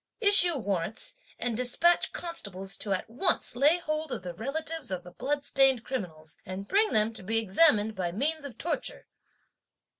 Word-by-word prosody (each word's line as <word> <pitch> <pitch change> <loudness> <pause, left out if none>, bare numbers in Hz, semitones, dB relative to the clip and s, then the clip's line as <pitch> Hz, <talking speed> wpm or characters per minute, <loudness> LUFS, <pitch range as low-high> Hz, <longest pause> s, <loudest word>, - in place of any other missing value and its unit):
Issue 405 -6 +8
warrants, 200 -3 -3 0.2
and 235 -1 -3
despatch 255 +9 +2
constables 200 - -3
to 205 - -4
at 190 - -2
once 240 - +1
lay 290 +7 +4
hold 310 -3 -4
of 235 -6 -5
the 175 -1 -6
relatives 305 - -4
of 185 -2 -4
the 180 - -12
bloodstained 270 -1 +1
criminals 160 -11 -7
and 190 +2 -7
bring 425 +2 +2
them 215 +1 +2
to 220 - -9
be 220 +4 -2
examined 220 - +3
by 180 -4 -3
means 290 - -2
of 280 -4 -9
torture." 340 - -3
245 Hz, 160 wpm, -28 LUFS, 195-310 Hz, 0.2 s, Issue